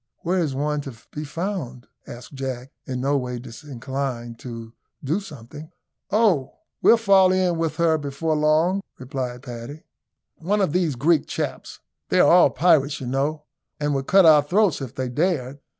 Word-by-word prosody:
Where 180 +2 0
is 150 -6 -1
one 150 +1 -1
to 135 -4 -8 0.2
be 150 - -5
found?" 155 -6 -5 0.2
asked 120 +3 -10
Jack, 130 -1 -5 0.2
in 130 -2 -3
no 140 +2 +1
way 125 -1 -4
disinclined 125 -1 -6
to 115 -2 -8 0.3
do 155 +8 0
something. 150 - -11 0.4
"Oh! 200 - +2 0.2
we'll 230 - +6
fall 195 -4 +5
in 185 -3 +1
with 165 -1 -1
her 165 -2 +2
before 145 +2 -2
long," 155 +6 +2 0.2
replied 125 -1 -5
Paddy. 125 +4 -8 0.5
"One 200 +6 -1
of 185 -7 +1
these 175 -6 +1
Greek 150 +4 +2
chaps. - - -5 0.3
They - - +2
are - - +6
all - - +7
pirates, 150 -4 +2
you 130 - -6
know, 140 +4 -1 0.4
and 145 -1 0
would 135 -1 -2
cut 195 -1 +6
our 155 -2 +7
throats 180 +1 +1
if 130 -4 -7
they 130 -1 -2
dared." 145 -1 -1
145 Hz, 165 wpm, -23 LUFS, 130-170 Hz, 0.5 s, all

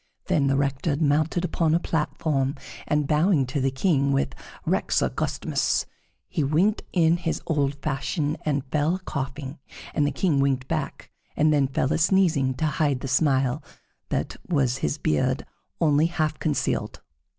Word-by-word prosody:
Then 140 -2 +2
the 135 0 +2
Rector 140 +2 0
mounted 155 +3 +1
upon 165 -2 +1
a - - +3
platform, 150 -4 -1 0.3
and 150 -1 +1
bowing 150 -1 +3
to 130 +2 -2
the 135 - +2
King 140 0 +1
with 135 0 0 0.3
"Rex - - +1
augustissimus" - - 0 0.4
he 155 - -1
winked 170 +10 +2
in 170 -1 +3
his 170 -2 -2
old 145 -4 0
fashion 150 +2 -1
and 145 -2 -1
fell 155 +3 +2
a - - -5
coughing, 140 -2 -5 0.3
and 145 -2 +2
the - - 0
King 145 0 +1
winked 135 -2 +1
back - - -4 0.3
and 155 0 +4
then 140 -2 +3
fell 135 +1 0
a - - 0
sneezing, 165 -7 +3
to 145 - -1
hide 145 -3 0
the - - -4
smile 130 -2 +2 0.5
that - - -2
his 130 - +1
beard 75 -1 0 0.3
only 155 0 +4
half 155 -3 -1
concealed. 150 -3 -1
145 Hz, 155 wpm, -25 LUFS, 135-160 Hz, 0.5 s, and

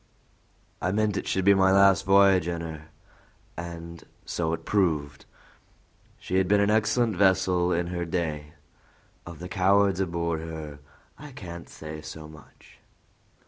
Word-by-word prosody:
I 90 - 0
meant 105 0 0
it - - -3
should 95 -1 -1
be 100 - +7
my 95 -1 +4
last 100 0 +4
v'y'ge 95 -3 +5
in 85 -1 -3
her, 80 -2 -8 0.7
and 85 0 -8 0.2
so 80 -2 -2
it 85 - -4
proved. 75 -8 0 0.9
She 95 - -3
had 95 -1 +2
been 105 +2 +3
an 100 +1 +2
excellent 110 +1 +1
vessel 95 -2 +2
in 85 0 0
her 85 0 -3
day. 80 -3 -4 0.7
Of 85 -2 -9
the 90 - -8
cowards 100 +1 +2
aboard 85 -3 -1
her 80 -3 -8 0.4
I 145 -1 -11
can't 85 -6 -9
say 75 0 -9
so 80 0 -9
much." 75 -2 -17
90 Hz, 145 wpm, -26 LUFS, 80-95 Hz, 0.9 s, be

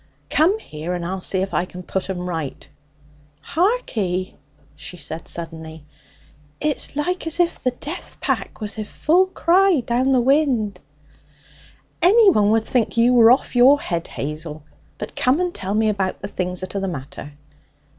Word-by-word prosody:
'Come 345 +8 +3
here, 170 - -6
and 175 -1 -4
I'll 190 +2 -4
see 185 0 0
if 195 - -5
I 175 - +1
can 180 0 -10
put 190 +2 -3
'em 180 -2 -3
right.' 160 -6 -5 0.7
'Harkee!' 240 - -1 0.4
she 155 +4 -8
said 160 0 -7
suddenly. 160 -2 -7 0.7
'It's 300 -1 -1
like 345 +4 -2
as 325 +2 0
if 345 -1 +1
the 255 - +3
jeath 290 +7 -8
pack - - -2
was 210 0 -3
i' - - -1
full 345 - +2
cry 370 -1 +3
down 250 +3 +1
the 260 - +4
wind.' 245 -7 +1 1.2
'Anyone 370 - +6
would 220 0 +2
think 240 -2 0
you 235 +2 +5
were 230 -2 +7
off 255 +1 +2
your 265 +4 +6
head, 170 -9 -3
Hazel. 150 +1 -6 0.3
But - - -7
come 255 +5 +2
and 360 -1 -1
tell 195 +2 -3
me 220 0 +2
about 195 -3 -1
the - - -2
things 180 -2 -3
that 185 - -6
are 200 - -1
the 195 - -2
matter.' 145 -2 -7
215 Hz, 165 wpm, -21 LUFS, 180-295 Hz, 1.2 s, were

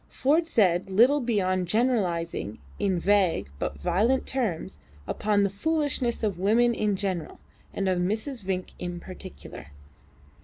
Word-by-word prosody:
Ford 310 +5 +2
said 190 - +2
little 240 +9 +5
beyond 185 -6 0
generalising 180 - 0 0.2
in 190 -3 +1
vague 185 - +2
but - - -3
violent 215 +9 +1
terms 210 - -3 0.3
upon 205 -1 +1
the 200 - +2
foolishness 275 0 0
of 200 -5 -1
women 230 +5 +3
in 210 -3 0
general, 185 -5 -3 0.3
and 195 - -2
of 185 -1 +1
Mrs. 220 +6 -2
Vinck 185 -1 -3
in 175 -1 -4
particular. 75 - -10
200 Hz, 130 wpm, -26 LUFS, 180-235 Hz, 0.3 s, little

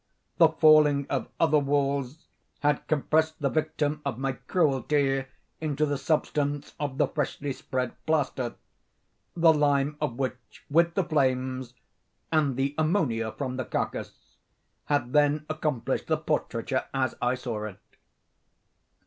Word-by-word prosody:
The 165 -2 +8
falling 155 -3 +5
of - - -1
other 155 -2 +4
walls 140 0 -1 0.4
had 145 -1 +1
compressed 155 +1 +1
the 140 -3 0
victim 155 -1 -1
of 140 -5 -3
my 135 +1 -1
cruelty 135 -2 +1 0.3
into 150 -1 0
the 145 -2 -2
substance 145 -1 -1
of 145 -3 -3
the - - +3
freshly 145 -2 -3
spread 130 -2 -3
plaster; 140 -6 0 0.8
the 165 -1 +6
lime 145 -1 +2
of 145 -6 -2
which, 130 -3 -5
with 170 +2 +3
the 195 - +2
flames, 130 -5 0 0.6
and 150 -5 +2
the 135 +1 0
ammonia 145 - +1
from 130 0 -4
the 130 - -2
carcass, - - -5 0.5
had 145 -4 0
then 150 0 +3
accomplished 150 -5 -2
the 155 - +2
portraiture 135 -4 -1
as 130 -2 +1
I 125 +1 +2
saw 115 -4 -4
it. 105 -4 -8
145 Hz, 130 wpm, -27 LUFS, 130-155 Hz, 0.8 s, The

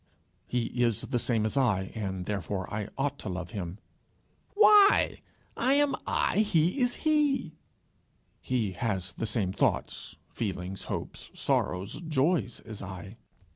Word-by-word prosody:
"He 120 -1 0 0.2
is 115 -4 +2
the 125 -3 -1
same 115 -3 +1
as 110 - -1
I, 105 -9 +1
and 95 -5 -4
therefore 100 -1 -2
I 105 -1 -2
ought 140 0 -1
to 110 - -5
love 90 0 -5
him." 95 -4 -5 0.8
"Why? 420 -1 +6 0.3
I 255 +3 +2
am 285 0 +3
I. - - +1
He 180 - +2
is 245 0 +3
he." 290 - +2 0.9
"He 120 -6 -1
has 95 -2 -2
the 115 - -3
same 105 -4 0
thoughts, - - -1 0.2
feelings, 95 -3 -4
hopes, - - -5
sorrows, 95 - 0
joys, 155 -4 0
as 110 -2 -9
I." 95 +2 -8
115 Hz, 135 wpm, -29 LUFS, 95-160 Hz, 0.9 s, Why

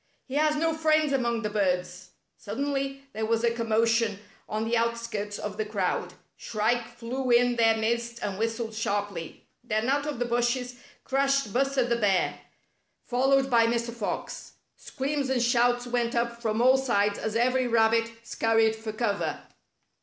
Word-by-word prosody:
He 260 - -10
has 300 +1 +2
no 325 +2 +1
friends 310 -2 +2
among 235 -3 0
the 210 - -1
birds 180 -3 -1
— - - -49
" - - -51
Suddenly 275 +4 -3
there 220 - -3
was 230 0 +1
a 235 - +3
commotion 230 -2 +1 0.3
on 215 +1 -2
the 235 - +1
out 235 0 +1
skirts 210 -3 -4
of 210 -1 -5
the 215 - 0
crowd. 205 -4 -2 0.2
Shrike 235 +2 -1
flew 255 +2 -4
in 245 0 +4
their 225 -1 +4
midst 235 +1 -1
and 195 -1 -3
whistled 225 0 -2
sharply. 205 -5 -3 0.2
Then 220 +1 -1
out 285 +2 +1
of 295 - -3
the 245 - -1
bushes 240 +1 -1 0.3
crashed 275 -5 +1
Buster 270 0 +2
the 235 -1 0
Bear, 200 -5 +1 0.7
followed 270 +2 +2
by 230 -1 +5
Mr. 235 0 -1
Fox. 230 -3 -5 0.2
Screams 280 0 -3
and 265 -1 +1
shouts 245 0 +2
went 240 -1 -1
up 235 0 -1
from 225 0 0
all 260 +1 +6
sides 205 -6 +1
as 220 0 -3
every 255 +2 +2
rabbit 230 0 +3
scurried 225 -1 +2
for 220 0 -6
cover. 215 -2 -1
235 Hz, 170 wpm, -27 LUFS, 220-255 Hz, 0.7 s, all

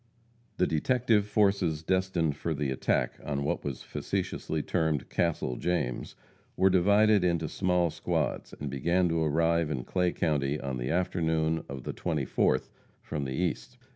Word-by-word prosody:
The 90 - +3
detective 110 +5 +2
forces 100 -7 +2
destined 95 -4 +1
for 80 +2 -2
the 70 -2 -1
attack 65 - 0
on 70 -1 -2
what 70 - -1
was 70 -4 -4
facetiously 80 -2 -3
termed 80 -5 0
"Castle 80 -8 0
James," 85 -9 -2 0.4
were 95 0 +4
divided 100 +2 +4
into 85 -3 +1
small 90 -2 +1
squads, - - -2
and 70 - -4
began 85 +6 +1
to 80 0 +1
arrive 80 +1 +2
in 65 -5 -2
Clay 90 +5 0
county 75 -2 0
on 65 -2 -4
the - - -3
afternoon 80 -2 0
of 65 -3 -6
the - - -4
24th, 75 -7 0 0.3
from 75 -3 -3
the 65 - -3
East. 90 - -2
80 Hz, 150 wpm, -29 LUFS, 75-90 Hz, 0.4 s, were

